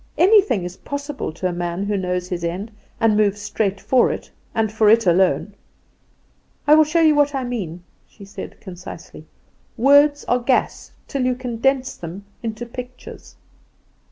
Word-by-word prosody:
Anything 385 - +4
is 180 +1 -7
possible 285 - -5
to 185 +3 -2
a 180 - -3
man 175 +2 -3
who 205 0 -1
knows 180 -1 -2
his 180 -2 -4
end 185 +6 -3 0.3
and 225 -2 +3
moves 210 -1 +2
straight 205 -1 -2
for 255 +3 +3
it, - - -7 0.2
and 220 -2 +1
for 215 -1 +3
it 225 0 +5
alone. 180 +1 +2 1.1
I 295 - +6
will 310 0 +7
show 330 +2 +1
you 315 -1 +6
what 290 -1 +2
I 265 - -1
mean," 185 -9 -5 0.2
she 200 - -14
said, 200 - -9
concisely; 180 -1 -10 0.5
"words 285 +4 +5
are 245 - +2
gas 250 +1 0 0.2
till 275 -2 -2
you 255 0 +1
condense 255 +2 -1
them 175 +4 -8 0.2
into 225 0 -4
pictures." 250 +1 -10
225 Hz, 160 wpm, -21 LUFS, 190-265 Hz, 1.1 s, will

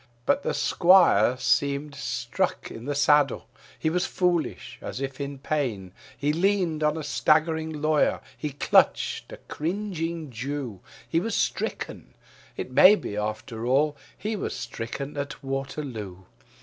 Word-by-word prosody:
But - - +2
the - - -2
squire 170 - +5
seemed 140 +2 +1
struck - - -2
in 115 +1 -8
the 145 0 -2
saddle; 145 -1 +3 0.3
he 160 - 0
was 180 +1 0
foolish, 175 -3 -1
as - - -5
if 135 0 -4
in 140 0 -4
pain. 125 -11 -2 0.2
He 145 +1 +1
leaned 175 -2 +1
on 150 +1 +2
a 160 - -4
staggering 160 +2 +2
lawyer, 155 -1 +3 0.2
he 150 - -4
clutched 140 - +2
a - - -8
cringing 165 -3 -4
Jew, 125 -3 -4 0.3
He 165 - +1
was 225 +5 -2
stricken; - - -3 0.4
it - - -5
may 185 +10 +8
be, 105 - -5
after 110 +2 -4
all, 145 +4 +3 0.2
he 215 +1 -3
was 200 - -3
stricken 135 +5 -5
at 140 0 -5
Waterloo. 135 -8 -5
145 Hz, 140 wpm, -26 LUFS, 130-160 Hz, 0.4 s, may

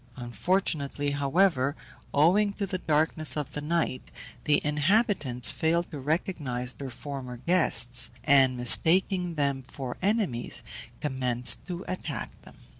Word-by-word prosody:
Unfortunately, 145 +2 -1
however, 140 0 +1 0.4
owing 195 +8 +3
to 200 - -3
the 185 -1 -4
darkness 155 0 +2
of 150 -3 -4
the 150 - -6
night, 150 -4 -2 0.4
the 150 -1 +3
inhabitants 150 - +2
failed 170 +2 -1
to 150 - -7
recognize 135 -5 -3
their 135 -1 -8
former 130 -1 -7
guests, 125 -5 +3
and, 135 -2 +4
mistaking 175 - +3
them 140 -2 -1
for 130 -1 -8
enemies, 195 - 0 0.4
commenced 125 -4 0
to 180 0 -6
attack 185 +1 -5
them. - - -16
145 Hz, 120 wpm, -27 LUFS, 130-175 Hz, 0.4 s, and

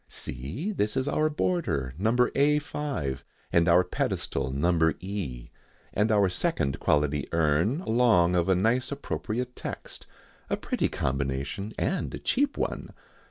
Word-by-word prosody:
See, 70 - -3
this 110 - -1
is 130 +1 0
our 155 +1 +2
border, 95 - -1
No. 110 +4 +2 0.2
A 145 +2 +4
5, 140 - -3 0.3
and 85 -1 +4
our 85 +2 +6
pedestal 70 -6 -2
No. 80 +4 +2
E, 90 -11 -5 0.4
and 105 +2 +2
our 100 -2 +4
second 90 - 0
quality 75 -1 +1
urn, 85 - +2
along 110 - +3
of 90 +1 +2
a 95 - +5
nice 115 +8 +1
appropriate 125 -3 -3
text - - -7 0.4
a - - 0
pretty - - -1
combination 70 +9 -2
and 185 - -1
a - - -5
cheap 280 +2 0
one. - - -3
95 Hz, 140 wpm, -27 LUFS, -, 0.4 s, our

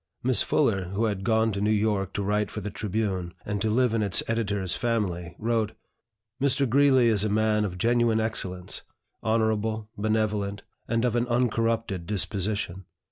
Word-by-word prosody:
Miss - - +3
Fuller, 95 -1 +2
who 100 +5 -1
had 100 -3 -2
gone 110 0 +2
to 100 -1 -3
New 105 - +2
York 105 -3 +1
to 100 - -2
write 105 +1 0
for - - -5
the 105 0 -5
"Tribune," 95 -4 -2
and 105 -1 -2
to 110 - +1
live 120 +1 +2
in 115 - +1
its 100 -3 +2
Editor's 100 -5 0
family, 90 -8 -2
wrote: 110 -1 0 0.7
"Mr. 140 0 +2
Greeley 130 -1 +5
is 105 -3 +2
a 110 - 0
man 105 0 +2
of 90 -3 -3
genuine 115 +1 +2
excellence, 95 -5 -3 0.4
honorable, 110 -1 0
benevolent, 105 -2 -1 0.2
and 115 +1 +1
of 120 -1 +1
an 120 0 +1
uncorrupted 115 -6 0
disposition. 100 -2 -2
110 Hz, 165 wpm, -26 LUFS, 100-115 Hz, 0.7 s, Greeley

